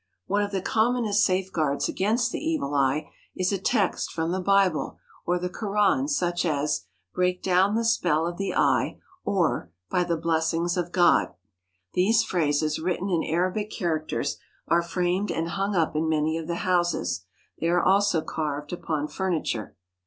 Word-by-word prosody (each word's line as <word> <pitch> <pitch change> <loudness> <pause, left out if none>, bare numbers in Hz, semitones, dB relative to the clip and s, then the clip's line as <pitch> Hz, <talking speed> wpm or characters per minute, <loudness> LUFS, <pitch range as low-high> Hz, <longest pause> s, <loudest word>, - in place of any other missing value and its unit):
One 205 +1 +1
of 205 - -1
the 195 -2 -3
commonest 220 -2 +2
safeguards 185 -7 0
against 225 +5 0
the - - -3
evil 315 - -1
eye 140 +2 +1 0.2
is 185 +1 0
a 195 - -1
text 200 -1 0
from 165 0 -2
the 185 +1 -1
Bible 195 -3 +2 0.3
or 175 +1 +2
the 180 +1 -2
Koran 210 +6 +1
such 175 - 0
as: 150 - 0 0.3
"Break 180 0 0
down 190 +3 +3
the 230 0 0
spell 175 -8 +2
of 175 0 -4
the 195 - -2
Eye"; - - +2 0.3
or 170 - 0
" 90 - -57
By 180 - +2
the 170 -1 -1
blessings 165 +1 0
of 175 -1 -2
God." 175 -1 +3 0.6
These 205 +6 +3
phrases 155 -3 0
written 180 +3 -2
in 170 -2 +1
Arabic 185 +5 -1
characters 165 -7 -2 0.3
are 170 - +3
framed 180 +3 -1
and 165 +1 -2
hung 195 +3 -1
up 165 -3 +1
in 160 +1 +1
many 155 0 +1
of 165 -1 -4
the 170 - -2
houses. 175 - 0 0.3
They 165 - 0
are 175 +1 +2
also 195 -3 +3
carved 150 0 -4
upon 155 -4 -2
furniture. 160 - -2
175 Hz, 165 wpm, -26 LUFS, 160-195 Hz, 0.6 s, down